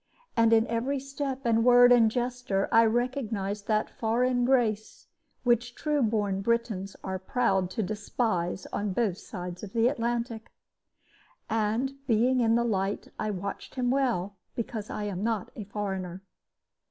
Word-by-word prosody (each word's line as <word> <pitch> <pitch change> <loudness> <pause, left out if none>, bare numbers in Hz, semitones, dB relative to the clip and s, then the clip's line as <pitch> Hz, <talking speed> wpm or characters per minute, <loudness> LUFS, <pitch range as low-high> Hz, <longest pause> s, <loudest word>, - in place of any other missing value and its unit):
And 230 -1 +4
in 225 0 +5
every 245 +4 -1
step 275 -1 -4
and 225 -1 +3
word 245 0 +7
and 235 -2 +6
gesture 245 -4 -1
I 230 0 +6
recognized 220 -4 -1
that 215 -1 +1
foreign 245 +2 +1
grace 230 -5 0 0.4
which 240 0 +1
true 300 -2 0
born 205 -4 0
Britons 215 -4 -1
are 190 0 -3
proud 190 -3 +1
to 215 +4 -2
despise 200 -3 -2
on 205 -2 -1
both 200 -4 0
sides 180 -2 -7
of 200 -2 -8
the 230 0 +3
Atlantic. 235 -2 -2 1.0
And, 230 +6 -1
being 245 +2 +3
in 230 -1 +3
the 235 - +3
light, 200 -3 -1
I 215 - -1
watched 200 0 -5
him 250 -2 +1
well, 230 -8 0 0.2
because 220 -2 -4
I 210 - -4
am 200 -2 -3
not 225 -3 -1
a 210 - -6
foreigner. 190 -3 -4
225 Hz, 150 wpm, -28 LUFS, 200-245 Hz, 1.0 s, word